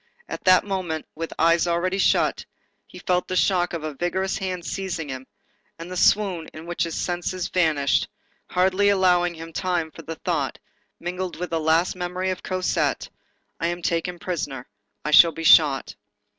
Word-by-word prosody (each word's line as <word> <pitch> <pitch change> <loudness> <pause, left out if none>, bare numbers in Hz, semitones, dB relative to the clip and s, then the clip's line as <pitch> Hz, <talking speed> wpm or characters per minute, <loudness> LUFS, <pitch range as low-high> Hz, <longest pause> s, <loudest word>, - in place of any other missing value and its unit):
At - - -7
that 185 0 +6
moment, 185 -6 -3
with 165 +1 -5
eyes 165 +1 +3
already 180 +3 0
shut, - - +2 0.4
he - - -13
felt 180 -1 0
the 185 - -3
shock 180 -1 +2
of 170 -2 -5
a 155 -1 -4
vigorous 185 +5 -2
hand 185 -2 -4
seizing 175 -5 -4
him, 130 0 -7 0.5
and 170 +2 -9
the - - -5
swoon 185 -3 +2
in 160 +1 -9
which 175 0 -1
his 165 - -5
senses 175 0 -2
vanished, 155 -6 +2 0.4
hardly 190 +2 +2
allowed 180 -3 +3
him 165 0 -9
time 175 -3 -1
for - - -11
the 165 - -7
thought, - - -2 0.4
mingled 180 +1 -4
with 175 0 -5
a 165 - +1
last 160 +4 +2
memory 180 +1 -2
of 185 - -5
Cosette:—"I 185 -2 -3
am 175 0 -4
taken 170 +1 -1
prisoner. 145 -8 -4 0.4
I 150 - -1
shall 165 +2 +8
be 165 - -6
shot." 145 -4 +5
175 Hz, 170 wpm, -24 LUFS, 165-185 Hz, 0.5 s, shall